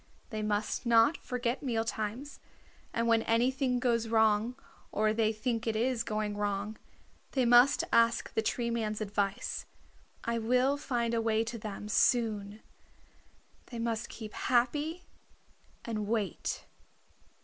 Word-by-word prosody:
They 215 Hz, -1 st, -3 dB
must 210 Hz, 0 st, -1 dB
not 230 Hz, +6 st, +5 dB
forget 245 Hz, 0 st, -3 dB
meal 230 Hz, -5 st, 0 dB
times, 225 Hz, +5 st, -4 dB, 0.5 s
and 230 Hz, 0 st, 0 dB
when 230 Hz, -1 st, +4 dB
anything 250 Hz, +3 st, +1 dB
goes 235 Hz, -2 st, +1 dB
wrong, 220 Hz, +1 st, +3 dB, 0.4 s
or 215 Hz, +1 st, +2 dB
they 220 Hz, -1 st, +2 dB
think 230 Hz, +1 st, -2 dB
it 225 Hz, -, 0 dB
is 235 Hz, +1 st, +1 dB
going 215 Hz, -2 st, -2 dB
wrong, 205 Hz, +1 st, -2 dB, 0.5 s
they 260 Hz, -3 st, +2 dB
must 245 Hz, +4 st, +6 dB
ask 230 Hz, 0 st, +3 dB
the -, -, +1 dB
Tree 235 Hz, +2 st, -1 dB
Man's 215 Hz, -2 st, -2 dB
advice. 200 Hz, -2 st, -2 dB, 0.6 s
I 235 Hz, 0 st, -1 dB
will 250 Hz, +4 st, +2 dB
find 240 Hz, -5 st, -1 dB
a 230 Hz, -, +1 dB
way 225 Hz, 0 st, +2 dB
to 230 Hz, 0 st, -5 dB
them 210 Hz, -1 st, -6 dB
soon. 215 Hz, -2 st, +1 dB, 1.1 s
They 240 Hz, -, -8 dB
must 230 Hz, 0 st, -2 dB
keep 215 Hz, -2 st, -8 dB
happy 295 Hz, +8 st, 0 dB, 0.8 s
and 215 Hz, -3 st, -3 dB
wait." 210 Hz, -5 st, -2 dB
230 Hz, 135 wpm, -31 LUFS, 215-240 Hz, 1.1 s, must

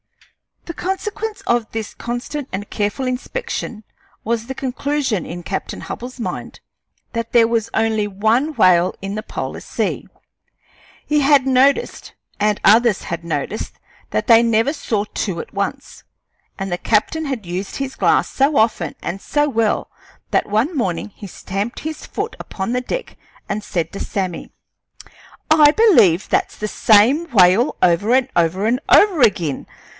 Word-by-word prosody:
The 335 Hz, -, -6 dB
consequence 420 Hz, +4 st, -4 dB
of 235 Hz, -2 st, 0 dB
this 220 Hz, -2 st, -4 dB
constant 255 Hz, +4 st, -5 dB
and 205 Hz, +2 st, -5 dB
careful 210 Hz, +6 st, -2 dB
inspection 255 Hz, -, -4 dB, 0.4 s
was 230 Hz, 0 st, -1 dB
the 265 Hz, -, -5 dB
conclusion 265 Hz, -, -2 dB
in 175 Hz, +1 st, -7 dB
Captain 190 Hz, +3 st, -4 dB
Hubbell's 250 Hz, +2 st, -7 dB
mind 235 Hz, -, -5 dB, 0.5 s
that 230 Hz, -1 st, -4 dB
there 235 Hz, -2 st, +6 dB
was 230 Hz, -1 st, 0 dB
only 220 Hz, -1 st, +1 dB
one 220 Hz, +10 st, +1 dB
whale 180 Hz, -5 st, +4 dB
in 195 Hz, +1 st, -4 dB
the 215 Hz, -, -3 dB
polar -, -, -5 dB
sea. -, -, -3 dB, 1.0 s
He 300 Hz, 0 st, +2 dB
had 280 Hz, -1 st, +4 dB
noticed, 270 Hz, -, +2 dB, 0.3 s
and 210 Hz, 0 st, +1 dB
others 220 Hz, 0 st, +4 dB
had 170 Hz, 0 st, -5 dB
noticed, 165 Hz, +5 st, -3 dB, 0.4 s
that -, -, -1 dB
they 230 Hz, -2 st, +7 dB
never 230 Hz, +4 st, +2 dB
saw 220 Hz, -8 st, -2 dB
two 185 Hz, -5 st, -2 dB
at -, -, -8 dB
once, 200 Hz, +8 st, -4 dB, 0.5 s
and 195 Hz, -1 st, -4 dB
the 175 Hz, -, 0 dB
captain 270 Hz, +9 st, +1 dB
had 260 Hz, -8 st, -4 dB
used 180 Hz, +3 st, -5 dB
his 275 Hz, -1 st, -4 dB
glass -, -, +2 dB
so 275 Hz, +2 st, +1 dB
often 215 Hz, -8 st, +1 dB
and 190 Hz, +3 st, -4 dB
so 295 Hz, 0 st, +1 dB
well 225 Hz, -4 st, 0 dB, 0.4 s
that -, -, +1 dB
one 230 Hz, -, +1 dB
morning 190 Hz, -, -2 dB
he 205 Hz, -, -9 dB
stamped 200 Hz, +5 st, -5 dB
his 315 Hz, 0 st, -6 dB
foot -, -, -4 dB
upon 190 Hz, +3 st, -4 dB
the 250 Hz, 0 st, 0 dB
deck -, -, -5 dB, 0.3 s
and 210 Hz, -, -2 dB
said 170 Hz, -5 st, -2 dB
to 195 Hz, -, -7 dB
Sammy: 185 Hz, -4 st, -4 dB, 1.0 s
"I 300 Hz, -2 st, +7 dB
believe 300 Hz, -, +4 dB
that's -, -, 0 dB
the 215 Hz, -, -3 dB
same 230 Hz, +11 st, +4 dB
whale 200 Hz, +3 st, +4 dB
over 180 Hz, +6 st, +3 dB
and 265 Hz, 0 st, +2 dB
over 175 Hz, +4 st, +1 dB
and 240 Hz, +3 st, +2 dB
over 385 Hz, -8 st, +5 dB
ag'in. 175 Hz, -, +1 dB
225 Hz, 155 wpm, -19 LUFS, 195-270 Hz, 1.0 s, they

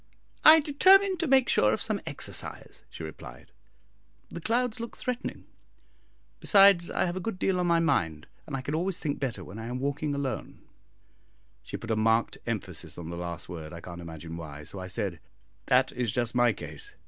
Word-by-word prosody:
"I 315 Hz, +1 st, +10 dB
determined 375 Hz, +6 st, +5 dB
to 335 Hz, -, 0 dB
make 265 Hz, -2 st, +5 dB
sure 105 Hz, 0 st, +3 dB
of -, -, -1 dB
some -, -, -2 dB
exercise," -, -, -3 dB
she -, -, -9 dB
replied, 70 Hz, -3 st, -10 dB, 0.8 s
"the 170 Hz, -, -7 dB
clouds 235 Hz, +3 st, 0 dB
look 230 Hz, 0 st, -6 dB
threatening; 250 Hz, 0 st, -4 dB, 0.9 s
besides, 195 Hz, -4 st, +6 dB
I -, -, 0 dB
have 175 Hz, 0 st, -2 dB
a -, -, -2 dB
good 190 Hz, +1 st, -4 dB
deal 185 Hz, -1 st, +1 dB
on 180 Hz, -, +1 dB
my 170 Hz, -1 st, +4 dB
mind, 95 Hz, -, 0 dB, 0.2 s
and 140 Hz, -3 st, -3 dB
I -, -, -4 dB
can 145 Hz, +3 st, -4 dB
always 180 Hz, +3 st, 0 dB
think 145 Hz, -2 st, -3 dB
better 120 Hz, -9 st, -3 dB
when 95 Hz, +5 st, -9 dB
I 115 Hz, -, -6 dB
am 125 Hz, +1 st, -3 dB
walking 145 Hz, +2 st, -1 dB
alone." 140 Hz, -2 st, -4 dB, 1.0 s
She -, -, -6 dB
put 115 Hz, -, -6 dB
a -, -, +2 dB
marked 115 Hz, +1 st, +2 dB
emphasis 90 Hz, -8 st, -5 dB
on 85 Hz, -1 st, -6 dB
the -, -, -5 dB
last 85 Hz, -1 st, -5 dB
word, 80 Hz, -2 st, -7 dB
I 85 Hz, -, -7 dB
can't 85 Hz, 0 st, -9 dB
imagine 80 Hz, 0 st, -8 dB
why, 75 Hz, -3 st, -8 dB
so 80 Hz, +6 st, -8 dB
I 95 Hz, -, -6 dB
said, 95 Hz, -3 st, -3 dB, 0.5 s
"That 130 Hz, +1 st, +4 dB
is 120 Hz, -4 st, -1 dB
just 120 Hz, 0 st, +1 dB
my 120 Hz, -1 st, +4 dB
case. 100 Hz, -, -9 dB
120 Hz, 195 wpm, -28 LUFS, -, 1.0 s, I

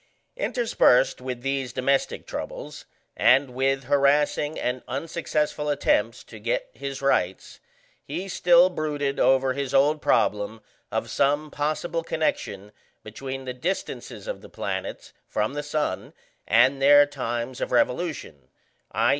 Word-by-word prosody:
Interspersed 230 Hz, -, +2 dB
with 125 Hz, -1 st, -5 dB
these 135 Hz, -2 st, -1 dB
domestic 135 Hz, +1 st, 0 dB
troubles, -, -, -7 dB, 0.3 s
and 130 Hz, +1 st, +4 dB
with 135 Hz, +2 st, 0 dB
harassing 145 Hz, +3 st, +2 dB
and 125 Hz, +1 st, -2 dB
unsuccessful 150 Hz, -2 st, -2 dB
attempts 115 Hz, -5 st, +1 dB
to 110 Hz, -, -12 dB
get 115 Hz, +3 st, -2 dB
his 140 Hz, 0 st, -6 dB
rights, 135 Hz, -, 0 dB, 0.4 s
he 190 Hz, +2 st, -5 dB
still 180 Hz, -1 st, +5 dB
brooded 145 Hz, -4 st, -2 dB
over 130 Hz, 0 st, +3 dB
his 140 Hz, -1 st, -3 dB
old 150 Hz, +3 st, +3 dB
problem 105 Hz, +2 st, +1 dB, 0.3 s
of -, -, -2 dB
some 145 Hz, +2 st, +1 dB
possible 155 Hz, +3 st, -2 dB
connection 105 Hz, -, -2 dB, 0.3 s
between 130 Hz, +4 st, -7 dB
the 125 Hz, -, -4 dB
distances 175 Hz, -, -4 dB
of -, -, -5 dB
the -, -, -13 dB
planets -, -, -5 dB
from -, -, -1 dB
the 145 Hz, -, -3 dB
sun 150 Hz, +1 st, -3 dB, 0.3 s
and 130 Hz, +5 st, +4 dB
their 145 Hz, +1 st, +7 dB
times 125 Hz, -3 st, -4 dB
of -, -, -2 dB
revolution, 125 Hz, -, -1 dB, 0.5 s
_i. 115 Hz, +2 st, +3 dB
140 Hz, 130 wpm, -25 LUFS, 125-150 Hz, 0.5 s, their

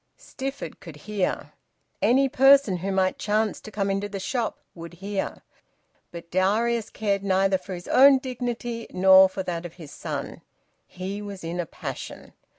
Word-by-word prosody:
Stifford 270 Hz, +1 st, -7 dB
could 165 Hz, -5 st, -11 dB
hear. 195 Hz, +4 st, -3 dB, 0.5 s
Any 270 Hz, +3 st, +4 dB
person 270 Hz, -6 st, +5 dB
who 190 Hz, +3 st, -3 dB
might 190 Hz, -1 st, +1 dB
chance 215 Hz, 0 st, 0 dB
to -, -, -10 dB
come 200 Hz, -1 st, -1 dB
into 200 Hz, +1 st, -2 dB
the 200 Hz, -1 st, -5 dB
shop 235 Hz, +4 st, -2 dB, 0.2 s
would 170 Hz, 0 st, -10 dB
hear. 195 Hz, +2 st, -4 dB, 0.7 s
But 170 Hz, -1 st, -10 dB
Darius 215 Hz, +5 st, +1 dB
cared 200 Hz, -2 st, -1 dB
neither 190 Hz, 0 st, +2 dB
for 190 Hz, -, -7 dB
his 175 Hz, -, -10 dB
own 275 Hz, +1 st, +7 dB
dignity 240 Hz, -2 st, -4 dB
nor 190 Hz, 0 st, +7 dB
for 190 Hz, 0 st, -4 dB
that 170 Hz, -2 st, -4 dB
of 175 Hz, -1 st, -8 dB
his 160 Hz, -5 st, -11 dB
son. -, -, -6 dB, 0.5 s
He 190 Hz, +3 st, -6 dB
was 200 Hz, -3 st, -8 dB
in 170 Hz, +2 st, -4 dB
a 175 Hz, -, -2 dB
passion. -, -, -8 dB
195 Hz, 160 wpm, -25 LUFS, 185-230 Hz, 0.7 s, own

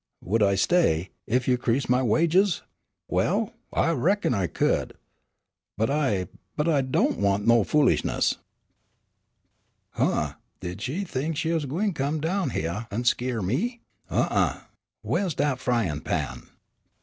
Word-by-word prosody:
"Would 110 Hz, +5 st, 0 dB
I 100 Hz, -1 st, +4 dB
stay, 95 Hz, -, +2 dB, 0.2 s
ef 125 Hz, +2 st, +1 dB
you 125 Hz, -1 st, +3 dB
'crease 125 Hz, +3 st, 0 dB
my 125 Hz, +1 st, +3 dB
wages? 170 Hz, -, +3 dB, 0.4 s
Well -, -, 0 dB, 0.2 s
I 165 Hz, -, +2 dB
reckon 170 Hz, +3 st, +1 dB
I 95 Hz, -5 st, 0 dB
could, -, -, 0 dB, 0.8 s
but 110 Hz, +5 st, +1 dB
I 120 Hz, -11 st, +1 dB, 0.3 s
but 150 Hz, -, 0 dB
I 150 Hz, -4 st, +3 dB
do' 130 Hz, -1 st, +1 dB
want 100 Hz, 0 st, +1 dB
no 115 Hz, -1 st, +5 dB
foolishness." 150 Hz, +4 st, +2 dB, 1.6 s
(Sola.) -, -, +2 dB, 0.2 s
"Huh! -, -, -14 dB, 0.3 s
Did 90 Hz, +2 st, -6 dB
she 140 Hz, -, -2 dB
think 155 Hz, -2 st, -3 dB
she 160 Hz, -, 0 dB
was 160 Hz, -4 st, 0 dB
gwine 190 Hz, +9 st, -1 dB
to 145 Hz, -, -4 dB
come 145 Hz, +3 st, 0 dB
down 170 Hz, +1 st, 0 dB
hyeah 90 Hz, +3 st, -3 dB
an' 110 Hz, +4 st, -2 dB
skeer 120 Hz, -2 st, 0 dB
me, 225 Hz, -, -1 dB, 0.3 s
huh, -, -, +1 dB
uh? -, -, +1 dB, 0.4 s
Whaih's 185 Hz, -7 st, 0 dB
dat 145 Hz, -2 st, 0 dB
fryin' 115 Hz, -, 0 dB
pan?" -, -, -3 dB
130 Hz, 150 wpm, -26 LUFS, 105-160 Hz, 1.6 s, no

